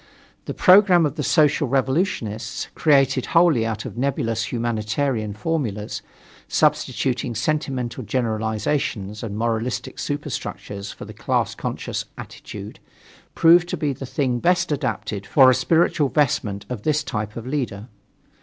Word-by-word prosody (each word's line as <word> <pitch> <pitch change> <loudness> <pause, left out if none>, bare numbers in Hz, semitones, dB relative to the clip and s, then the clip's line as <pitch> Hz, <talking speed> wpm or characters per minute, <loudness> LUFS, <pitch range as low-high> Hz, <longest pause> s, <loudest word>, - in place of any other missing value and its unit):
The - - -5
programme 185 -3 +6
of 145 - -1
the 155 - -3
Social 150 0 +3
Revolutionists 130 - -1
created 135 -4 +3
wholly 155 -10 +4
out 110 -1 -4
of 115 - -6
nebulous 115 -5 -1
humanitarian 115 -1 -1
formulas, 110 -6 -3 0.5
substituting 125 -2 0
sentimental 130 -1 -2
generalizations 110 -2 -2
and 105 -3 -5
moralistic 115 +2 -2
superstructures 105 -8 -5
for - - -10
a - - -10
class - - -1
conscious - - -4
attitude, - - -9 0.6
proved 170 +1 +5
to - - -2
be 145 -2 -1
the 135 +1 -8
thing 130 -2 -1
best 175 +3 +2
adapted 105 -8 -3
for 130 -3 +6
a - - +4
spiritual 150 +2 +2
vestment 110 -9 0
of 125 -5 -5
this 150 +4 +1
type 105 -3 -4
of 115 - -6
leaders. 125 -7 -3
125 Hz, 130 wpm, -22 LUFS, 110-145 Hz, 0.6 s, programme